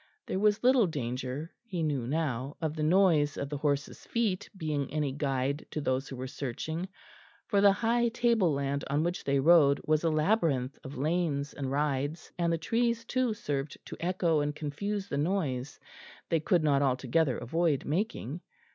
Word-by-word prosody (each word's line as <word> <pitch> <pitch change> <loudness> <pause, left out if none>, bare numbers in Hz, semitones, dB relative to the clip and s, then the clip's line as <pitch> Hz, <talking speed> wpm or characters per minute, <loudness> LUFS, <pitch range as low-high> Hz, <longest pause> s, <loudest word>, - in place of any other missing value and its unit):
There 190 - -2
was 210 +1 +2
little 250 -4 +5
danger, 130 +1 -4
he 185 -8 -3
knew 140 -6 -1
now, 140 -3 -2
of 155 -1 -2
the 155 - -3
noise 155 -3 +3
of 140 - -3
the 145 - -3
horses' 145 -1 -1
feet 205 -4 -1
being 150 -5 -2
any 150 -2 0
guide 140 0 -1
to - - -3
those 135 -1 -1
who 135 - -6
were 130 +1 -5
searching, 155 +7 -4 0.6
for 200 -3 +2
the 200 0 +7
high 235 +4 +2
table 230 -6 +2
land 140 0 -1
on 145 +3 +1
which 175 +2 -2
they 140 0 +2
rode 145 -2 +6
was 155 0 +2
a 165 - +3
labyrinth 155 - +1
of 135 +1 -8
lanes 150 -1 0
and 135 -2 -4
rides, 145 +2 -1
and 170 -1 +2
the 165 - +1
trees 230 +6 0
too 250 -2 0
served 145 -6 -3
to - - -8
echo 170 -2 +1
and 145 0 -1
confuse 195 +7 -3
the 140 - -2
noise 145 -6 -1 0.5
they 165 - +2
could 170 +1 +2
not 140 -2 +3
altogether 135 +1 +1
avoid 155 +3 0
making. 165 - -2
155 Hz, 175 wpm, -30 LUFS, 140-180 Hz, 0.6 s, the